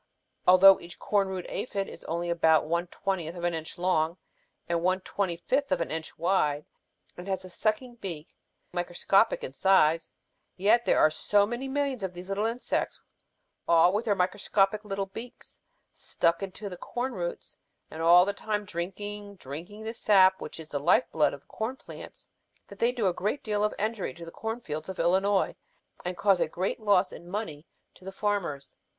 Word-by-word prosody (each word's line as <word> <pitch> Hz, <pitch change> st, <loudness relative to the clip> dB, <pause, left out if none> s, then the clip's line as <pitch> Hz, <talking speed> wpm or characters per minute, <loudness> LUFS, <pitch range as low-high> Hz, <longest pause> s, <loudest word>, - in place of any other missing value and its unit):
Although 185 Hz, +1 st, +8 dB
each 170 Hz, 0 st, -11 dB
corn 200 Hz, -2 st, +1 dB
root 185 Hz, -2 st, -4 dB
aphid 200 Hz, -5 st, -3 dB
is -, -, -10 dB
only 170 Hz, +1 st, -2 dB
about 160 Hz, -2 st, +4 dB
one 170 Hz, +2 st, -1 dB
twentieth 175 Hz, -2 st, -3 dB
of 175 Hz, -, -7 dB
an 175 Hz, 0 st, +1 dB
inch 160 Hz, -1 st, -6 dB
long 175 Hz, -2 st, +1 dB, 0.5 s
and 170 Hz, -1 st, 0 dB
one 185 Hz, +2 st, +2 dB
twenty 185 Hz, -3 st, -2 dB
fifth 270 Hz, +10 st, -1 dB
of -, -, +2 dB
an 170 Hz, -, -2 dB
inch 160 Hz, 0 st, -5 dB
wide 150 Hz, -4 st, +1 dB, 0.5 s
and 180 Hz, +2 st, -9 dB
has 190 Hz, -1 st, -2 dB
a 185 Hz, -, -11 dB
sucking 230 Hz, +5 st, -1 dB
beak 170 Hz, -8 st, -6 dB
simply -, -, -38 dB, 0.4 s
microscopic 195 Hz, +5 st, +2 dB
in 130 Hz, -, -5 dB
size, 165 Hz, -2 st, +3 dB, 0.5 s
yet 220 Hz, +5 st, +4 dB
there -, -, +3 dB
are 155 Hz, -, +5 dB
so 200 Hz, +6 st, +2 dB
many 240 Hz, +5 st, -4 dB
millions 275 Hz, -3 st, -1 dB
of 190 Hz, -2 st, -4 dB
these 180 Hz, +2 st, -9 dB
little 205 Hz, +3 st, 0 dB
insects 235 Hz, +2 st, -2 dB, 0.7 s
all 170 Hz, +2 st, +5 dB
with 215 Hz, +3 st, 0 dB
their 205 Hz, -3 st, +2 dB
microscopic 195 Hz, +2 st, +1 dB
little 195 Hz, -1 st, -3 dB
beaks 225 Hz, +5 st, -11 dB, 0.3 s
stuck 170 Hz, +3 st, 0 dB
into 195 Hz, +2 st, -6 dB
the 180 Hz, -2 st, -7 dB
corn 245 Hz, +7 st, -3 dB
roots 175 Hz, -4 st, -5 dB, 0.3 s
and 160 Hz, -, -6 dB
all 175 Hz, +2 st, +7 dB
the 200 Hz, -, -1 dB
time 210 Hz, 0 st, -3 dB
drinking, 200 Hz, +3 st, -5 dB
drinking 175 Hz, +8 st, -8 dB
the 225 Hz, +1 st, -4 dB
sap 190 Hz, -4 st, +4 dB
which -, -, -7 dB
is 155 Hz, -1 st, -9 dB
the 145 Hz, -, -2 dB
life 220 Hz, -, +4 dB
blood 155 Hz, -, +3 dB
of 140 Hz, -, -9 dB
the -, -, -36 dB
corn 225 Hz, +4 st, -4 dB
plants -, -, -11 dB, 0.4 s
that -, -, -13 dB
they 235 Hz, +1 st, +3 dB
do 240 Hz, -4 st, -2 dB
a 180 Hz, -, +2 dB
great 205 Hz, +10 st, -2 dB
deal 210 Hz, -1 st, 0 dB
of 210 Hz, -, +2 dB
injury 210 Hz, -, -2 dB
to 170 Hz, -, -9 dB
the 165 Hz, -, -9 dB
corn 225 Hz, +5 st, -4 dB
fields 155 Hz, -6 st, -6 dB
of 190 Hz, -, -6 dB
Illinois 190 Hz, +4 st, +2 dB, 0.5 s
and 180 Hz, 0 st, -4 dB
cause 195 Hz, -3 st, +3 dB
a -, -, +2 dB
great 185 Hz, +7 st, -2 dB
loss 200 Hz, -3 st, +3 dB
in 175 Hz, -, -11 dB
money 175 Hz, -7 st, -5 dB, 0.3 s
to -, -, -20 dB
the 190 Hz, -, -6 dB
farmers. 195 Hz, -9 st, -2 dB
190 Hz, 195 wpm, -28 LUFS, 170-210 Hz, 0.7 s, Although